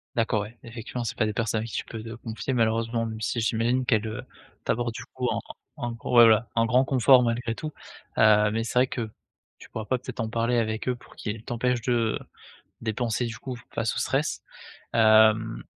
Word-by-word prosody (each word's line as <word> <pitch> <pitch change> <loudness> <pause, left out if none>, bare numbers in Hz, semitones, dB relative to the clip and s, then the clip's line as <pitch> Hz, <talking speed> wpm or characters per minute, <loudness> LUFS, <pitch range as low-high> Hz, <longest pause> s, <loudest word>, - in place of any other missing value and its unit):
D'accord, 115 -2 +1
ouais, 110 +3 -8
effectivement, 115 +1 -6
c'est - - -4
pas 110 - +2
des 105 - -1
personnes 110 0 0
à - - -4
qui 115 - -9
tu - - -2
peux 110 -1 -7
te 115 0 -7
confier, 115 +3 -4
malheureusement, 115 0 +1
même 110 -1 -6
si 110 +2 -1
j'imagine 115 +3 +1
qu'elles, 110 -4 +2
heu, 110 +4 -4 0.4
t'apportent, 120 0 -1
du - - -7
coup, - - -5
en - - 0 0.4
en 120 - -3
ouais, - - -6
voilà, 115 -2 +6
un 115 0 +3
grand 125 +3 +4
confort 130 -1 +5
malgré 115 0 -1
tout, 155 +3 -6 0.5
heu, 105 -1 +6
mais 115 +1 -1
c'est 120 - -3
vrai 125 - +6
que 120 -3 -4 0.5
tu - - -14
pourras 110 -1 -5
pas 130 - +1
peut-être 125 -1 -9
en 110 - -1
parler 115 +2 +1
avec 110 0 -2
eux 125 - +1
pour 120 +1 -18
qu'ils 110 0 -5
t'empêchent 125 0 -1
de 115 -2 +1 0.6
dépenser, 115 +1 -1
du 115 - -5
coup, 130 +1 -6 0.2
face - - 0
au - - -1
stress. - - 0 0.5
Hem 110 - +5
115 Hz, 210 wpm, -26 LUFS, 110-120 Hz, 0.6 s, voilà